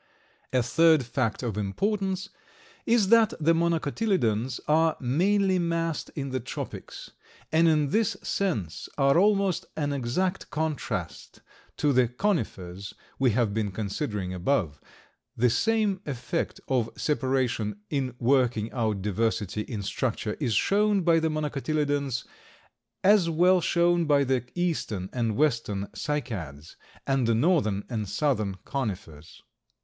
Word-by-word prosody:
A 125 -2 +2
third 160 +2 +4
fact 120 -1 -1
of 110 -4 -2
importance 195 - -1 0.6
is 225 -4 +3
that 230 -2 +5
the 165 +2 +3
Monocotyledons 160 - 0
are 160 +1 +3
mainly 185 +8 +2
massed 165 -2 -1
in 140 -2 -3
the 130 0 -2
tropics, 120 - -7 0.4
and 165 +1 +4
in 150 -3 +3
this 220 -2 +1
sense 110 - -2
are 140 +3 +4
almost 195 -3 +2
an 145 -2 -1
exact 140 +9 -1
contrast 145 - -4 0.4
to 145 -1 +2
the 125 -1 +4
Conifers 105 - -3 0.2
we 130 -1 +4
have 115 -2 +1
been 110 -1 -1
considering 100 -1 -3
above. 90 - -1 0.6
The 120 0 +3
same 215 - +1
effect 125 -4 -3
of 125 -4 +1
separation 130 -7 0
in 130 -4 -1
working 120 -3 +1
out 110 -6 -1
diversity 105 0 -1
in 105 -2 -5
structure 115 0 -2
is 120 -8 0
shown 205 - +3
by 165 -1 +4
the 160 0 0
Monocotyledons 145 -3 -1 0.8
as 195 -3 +5
was 180 +2 +4
shown 175 0 +2
by 145 -2 +4
the 130 -3 0
eastern 150 - -2
and 115 -4 -1
western 115 -9 0
Cycads, 95 - -4 0.3
and 135 -3 +1
the 115 - +3
northern 115 - +2
and 110 -5 -3
southern 110 -10 0
Conifers. 90 - -5
135 Hz, 125 wpm, -27 LUFS, 110-165 Hz, 0.8 s, that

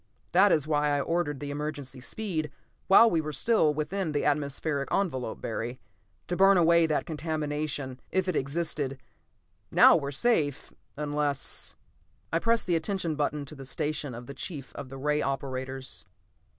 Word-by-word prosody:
That 195 +3 +6
is 155 -4 +3
why 150 -1 +1
I 145 0 +2
ordered 155 -2 -1
the 145 -1 -5
emergency 145 -3 -5
speed 160 - -3 0.4
while 215 +4 +8
we 165 -7 +2
were 155 0 -4
still 160 - +3
within 155 +3 -2
the 145 - 0
atmospheric 145 0 -1
envelope, 130 - -1
Barry. 120 +2 -4 0.5
To 175 - -1
burn 195 +1 +6
away 170 -1 +5
that 155 - 0
contamination, 150 -4 -3
if 190 0 0
it 185 - 0
existed. 140 -1 -1 0.7
Now - - +7
we 145 -4 -1
are - - -3
safe, 145 - +1 0.2
unless 145 -1 -1 0.3
" - - -31
I 165 - +3
pressed 230 +4 +2
the 175 - +2
attention 170 0 -1
button 150 -1 -1
to 140 - -9
the 135 -2 -9
station 145 0 -3
of 120 +1 -8
the 140 - -8
chief 140 -1 -7
of 130 - -7
the 135 - -8
ray 150 +2 +1
operators. 130 -1 -4
150 Hz, 165 wpm, -28 LUFS, 140-165 Hz, 0.7 s, while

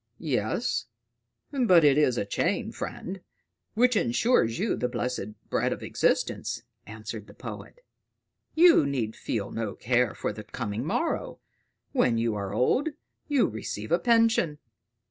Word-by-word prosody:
"Yes; - - -1 0.6
but 230 - +5
it 145 -2 +6
is 135 -5 +3
a 100 - 0
chain, 100 - -1
friend, 190 +1 -6 0.5
which 250 +2 +4
ensures 120 - +2
you 210 +4 0
the 125 - -1
blessed 120 -4 -4
bread - - +1
of - - -4
existence," - - 0 0.2
answered 110 0 -7
the - - -15
poet. - - -9 0.7
"You 330 - +6
need 120 -6 -2
feel 105 -4 -3
no 110 -3 -3
care 125 -1 +1
for - - -3
the 105 +1 -8
coming 105 0 -4
morrow: - - -2 0.5
when 115 - +2
you 115 -1 +1
are 100 -2 -4
old, 260 - +2 0.4
you 285 -4 +3
receive 110 -1 -5
a 170 - +4
pension." 230 -10 +3
125 Hz, 140 wpm, -27 LUFS, -, 0.7 s, it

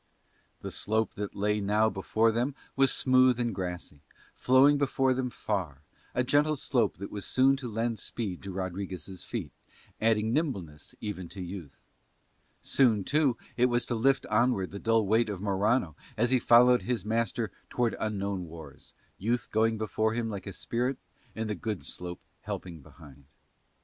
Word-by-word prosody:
The - - -5
slope 110 0 0
that 100 0 -5
now 105 +1 +1
lay - - -2
before 110 +3 +2
them 125 +5 -1 0.2
was 135 -1 +4
smooth 130 -1 +4
and 120 -2 0
grassy, 90 -5 -5 0.3
flowing 135 +3 +5
before 135 -2 +2
them 130 0 -2
far, 90 - -3 0.3
a 125 - +2
gentle 145 +4 +3
slope 125 -6 0
that 100 +2 -7
was 100 -2 -5
soon 135 +6 +4
to 125 -4 -6
lend 115 0 -1
speed 95 -4 -4
to 95 - -6
Rodriguez' 95 -1 -5
feet, - - -5 0.5
adding 110 0 +2
nimbleness 100 - -3
even 95 -5 -5
to 95 - -7
youth. 90 -5 -9 0.8
Soon, 115 -7 +3
too, 145 0 +2 0.2
it 125 +1 +4
was 120 -1 +1
to 125 - -2
lift 135 +4 +2
onward 110 -3 +1
the 100 - -6
dull 115 0 +2
weight 110 +3 +2
of 100 -3 -4
Morano 100 - +1 0.2
as 120 +3 +2
he 130 - +4
followed 125 +1 +6
his 120 -5 -2
master 115 -1 -1 0.2
towards 120 -2 0
unknown 100 -3 -2
wars, 80 -4 -12 0.2
youth 120 +4 -1
going 110 +1 +2
before 110 +1 0
him 115 -2 -2
like 100 -1 -6
a 100 - -5
spirit 125 +7 -2 0.4
and 110 0 -3
the 105 - -1
good 100 -5 -4
slope 90 +5 -4 0.2
helping 85 -4 -6
behind. 70 -1 -16
110 Hz, 165 wpm, -29 LUFS, 95-125 Hz, 0.8 s, followed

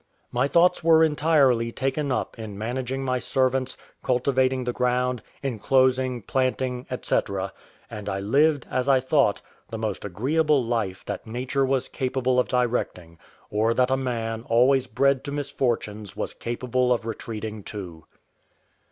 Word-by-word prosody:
My 125 +3 +1
thoughts 175 +3 +3
were 160 -1 +6
entirely 145 -7 +3
taken 135 +3 -1
up 125 - -2
in 105 -3 -7
managing 130 +4 -3
my 130 -1 0
servants, 130 0 0 0.2
cultivating 130 0 +1
the 125 0 -2
ground, 125 -1 0 0.2
enclosing, 130 0 +1
planting, 130 +1 -1 0.2
&c. - - +2 0.7
and 105 -2 -6
I 95 - -2
lived, 140 +7 +2
as 130 +1 0
I 135 -1 +5
thought, 130 -5 +2 0.3
the 115 - -5
most 110 -3 -3
agreeable 135 - +1
life 110 -5 -2
that 100 +2 -5
nature 125 +4 -1
was 135 -1 0
capable 130 -1 0
of 125 - +2
directing, 115 -9 -1 0.3
or 110 +2 +1
that 125 +1 +2
a - - +4
man 115 -4 -2
always 130 +3 +4
bred 135 +4 +2
to 140 - -4
misfortunes 120 -8 -2
was - - -3
capable 125 +1 -1
of 120 -2 +1
retreating 110 -1 -5
to. 90 -6 -8
125 Hz, 145 wpm, -25 LUFS, 115-135 Hz, 0.7 s, were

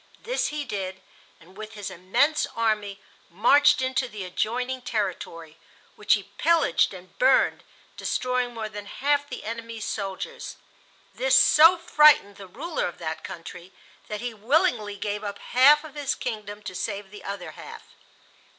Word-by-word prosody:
This - - -1
he 295 -1 -4
did, 190 -5 -5 0.4
and 180 +4 -19
with 215 +1 -9
his 205 -3 -6
immense 230 - +1
army 210 -3 -1 0.3
marched 260 +9 +4
into 260 0 0
the 210 -4 -7
adjoining 250 +7 -2
territory, 170 -8 -4 0.4
which - - +3
he - - -8
pillaged 335 -2 +3
and 185 -2 -12
burned, 260 +1 +3 0.3
destroying 250 -1 -1
more 220 -1 -4
than 205 -1 -9
half 285 +3 0
the - - -7
enemy's 230 0 -6
soldiers. 205 - -5 0.6
This - - +2
so 330 +4 +7
frightened 300 -11 +5
the 195 - -10
ruler 335 - -3
of 175 - -8
that 160 -2 -5
country 175 +2 -9 0.3
that 210 0 -5
he 245 -1 -4
willingly 225 - +1
gave 205 +1 -3
up 200 -1 -5
half 285 +5 +5
of 310 -3 -11
his 290 -1 -2
kingdom 210 -3 -6
to 190 - -6
save 200 +1 -4
the 210 - -11
other 185 -5 -6
half. - - -11
220 Hz, 150 wpm, -25 LUFS, 195-275 Hz, 0.6 s, so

